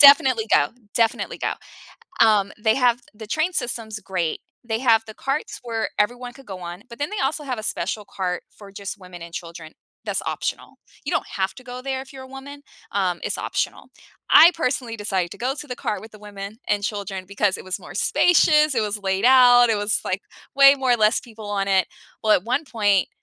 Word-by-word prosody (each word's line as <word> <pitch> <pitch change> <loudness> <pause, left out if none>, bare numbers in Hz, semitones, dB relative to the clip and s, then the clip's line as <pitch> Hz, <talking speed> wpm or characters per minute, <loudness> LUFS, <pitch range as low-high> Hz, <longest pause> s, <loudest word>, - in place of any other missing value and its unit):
Definitely 265 -5 +7
go. 145 - +4 0.3
Definitely 230 -1 +1
go. - - -1 0.7
Um, 205 -3 +3
they 220 0 +3
have 245 -2 +3
the 220 0 -10
train 315 +10 -1
system's 230 -5 -3
great. 185 -6 -2 0.2
They 225 -2 -2
have 230 -3 +4
the 215 - -8
carts 275 +3 -3
where 225 -2 -2
everyone 245 +4 0
could 270 +1 -16
go 190 -2 -7
on, 175 +2 -8
but 235 +1 -12
then 290 - -1
they 425 - -2
also 300 +3 -1
have 255 -5 -4
a 215 - -6
special 205 +4 -2
cart 180 -2 -3
for 205 -2 -12
just 200 +1 -7
women 180 -1 -11
and 170 0 -10
children 165 -2 -8 0.3
that's - - -2
optional. - - -4 0.3
You - - -3
don't - - 0
have 190 -1 -2
to 255 - -12
go 250 0 -8
there 265 0 -2
if 265 0 -11
you're 265 - -9
a - - -10
woman, 280 +2 -10 0.3
um, 185 -3 0
it's - - -1
optional. - - -3 0.4
I 340 +3 +9
personally 255 -7 -2
decided 190 -4 -2
to - - -9
go 255 +3 -1
to 295 - -7
the 250 - -5
cart 210 - -3
with 220 0 -12
the 215 - -14
women 205 +1 -8
and 205 -1 +1
children 195 -3 -4
because 200 0 0
it - - -10
was 185 0 -4
more - - -11
spacious, 305 -5 +4
it 225 - +2
was 210 0 -2
laid 190 +2 0
out, 245 -1 +7
it 225 - +3
was, 205 0 +1
like, 185 +1 -1 0.3
way 275 0 +8
more 260 -2 +2
less 215 -2 +3
people 220 -3 -11
on 200 -1 -1
it. 190 -2 +2 0.3
Well, 215 -1 +4
at 180 - 0
one 255 +6 0
point, 205 -7 +2
220 Hz, 215 wpm, -23 LUFS, 200-255 Hz, 0.7 s, I